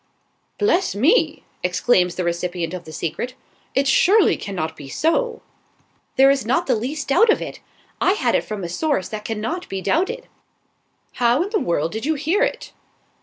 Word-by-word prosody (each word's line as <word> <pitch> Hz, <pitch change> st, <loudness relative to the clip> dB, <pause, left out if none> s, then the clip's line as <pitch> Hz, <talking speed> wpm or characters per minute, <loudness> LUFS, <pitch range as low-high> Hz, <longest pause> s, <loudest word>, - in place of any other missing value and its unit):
"Bless 390 Hz, -, +1 dB
me!" 305 Hz, -, +2 dB, 0.2 s
exclaims 180 Hz, 0 st, +2 dB
the 185 Hz, -, -2 dB
recipient 175 Hz, 0 st, -2 dB
of 180 Hz, -2 st, -6 dB
the 160 Hz, -, -10 dB
secret. 170 Hz, +11 st, -4 dB, 0.4 s
"It 275 Hz, +1 st, +2 dB
surely 390 Hz, +9 st, +5 dB
cannot 160 Hz, -6 st, -4 dB
be 140 Hz, -3 st, -10 dB
so!" 460 Hz, -, 0 dB, 0.7 s
"There 270 Hz, +1 st, +6 dB
is 275 Hz, -1 st, 0 dB
not 260 Hz, +10 st, +1 dB
the 260 Hz, -, +2 dB
least 270 Hz, +7 st, -3 dB
doubt 420 Hz, +12 st, +5 dB
of -, -, +4 dB
it. -, -, -7 dB, 0.4 s
I 375 Hz, -, +4 dB
had 415 Hz, -, 0 dB
it -, -, +2 dB
from 210 Hz, -3 st, -5 dB
a -, -, -2 dB
source 275 Hz, -, -1 dB
that 215 Hz, -1 st, -6 dB
cannot 230 Hz, +12 st, -3 dB
be 195 Hz, -, -3 dB
doubted." 470 Hz, -, -1 dB, 0.9 s
"How 240 Hz, +6 st, +4 dB
in 400 Hz, -, -6 dB
the 425 Hz, -, +1 dB
world 165 Hz, -, 0 dB
did 220 Hz, +6 st, -4 dB
you 315 Hz, -, +2 dB
hear 320 Hz, +9 st, 0 dB
it?" -, -, -1 dB
255 Hz, 175 wpm, -21 LUFS, -, 0.9 s, There